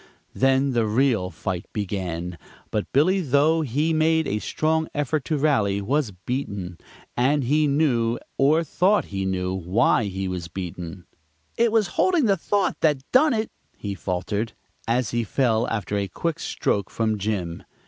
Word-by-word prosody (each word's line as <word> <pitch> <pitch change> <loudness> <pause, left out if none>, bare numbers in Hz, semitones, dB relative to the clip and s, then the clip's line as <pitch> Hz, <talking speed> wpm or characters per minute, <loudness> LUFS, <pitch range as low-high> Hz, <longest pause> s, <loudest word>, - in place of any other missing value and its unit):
Then 135 +1 +2
the 115 -3 +1
real 110 -4 +2
fight 90 +1 -4
began, 90 -4 -3 0.3
but 105 - -2
Billy, 185 +8 +3
though 150 +2 +3
he 150 +4 0
made 160 0 +2
a 105 - -1
strong 160 +6 0
effort 145 0 0
to 155 - 0
rally, 110 -10 +2
was 130 +5 0
beaten, 95 -2 -5 0.4
and 135 +4 +2
he 150 +4 +2
knew, 125 -6 +2 0.2
or 155 +5 +3
thought 185 +6 +2
he 95 0 -1
knew, 90 -1 -1
why 95 +6 +2
he 95 -1 -3
was 90 -2 -4
beaten. 90 0 -7 0.5
"It 235 -1 +3
was 215 -4 +2
holding 355 -7 +3
the 200 -3 +4
thought 195 +2 0
that 150 -4 +2
done 285 +2 +5
it," 220 0 -2 0.3
he 100 -1 -4
faltered, 100 +4 -3 0.3
as 120 0 +1
he 120 0 0
fell 115 0 +1
after 105 -2 -2
a 100 -1 -1
quick 165 - -3
stroke 100 - -1
from 110 -2 -1
Jim. 95 -5 -2
120 Hz, 160 wpm, -24 LUFS, 100-155 Hz, 0.5 s, done